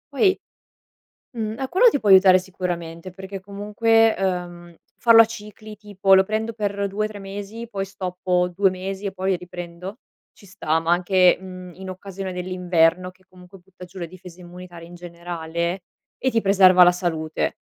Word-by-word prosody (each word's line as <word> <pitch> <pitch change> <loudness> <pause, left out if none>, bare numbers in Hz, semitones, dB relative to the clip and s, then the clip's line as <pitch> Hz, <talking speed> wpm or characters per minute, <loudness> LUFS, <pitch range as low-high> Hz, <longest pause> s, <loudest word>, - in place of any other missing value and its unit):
Poi 380 +7 +3 1.0
mhmm, 220 0 -3
ah, 265 - -2
quello 410 - +5
ti 285 - -1
può 205 - -1
aiutare 190 -1 +7
sicuramente 180 -2 -6
perché, 190 +1 -8
comunque, 210 +3 +1
ehm, 175 -2 -4 0.2
farlo 230 -1 +7
a - - +5
cicli, 215 -1 -10
tipo: 200 -2 +2
"Lo 190 - +5
prendo 220 +3 -3
per 200 -2 -2
2-3 215 +1 -4
mesi, 205 +4 -8
poi 195 -3 -4
stoppo 180 -1 -2
2 195 +1 +2
mesi 190 +2 -6
e 195 - -2
poi 190 -1 -1
riprendo" 180 +4 -9 0.4
ci 200 - -18
sta, 165 -4 -1
ma 165 +1 -1
anche, 180 +1 +4
mhmm, 185 -1 -10
in 190 0 -9
occasione 190 0 -7
dell'inverno 180 -1 0
che, 185 +1 -30
comunque, 185 +1 -16
butta 180 0 -14
giù 185 +1 -12
le 170 - -4
difese 180 0 -14
immunitarie, 175 -1 -11
in 175 - -13
generale, 170 0 -5 0.3
e 260 - -1
ti 225 -1 +1
preserva 190 -2 +6
la 175 - +6
salute. 165 -3 -3
185 Hz, 165 wpm, -22 LUFS, 180-200 Hz, 1.0 s, aiutare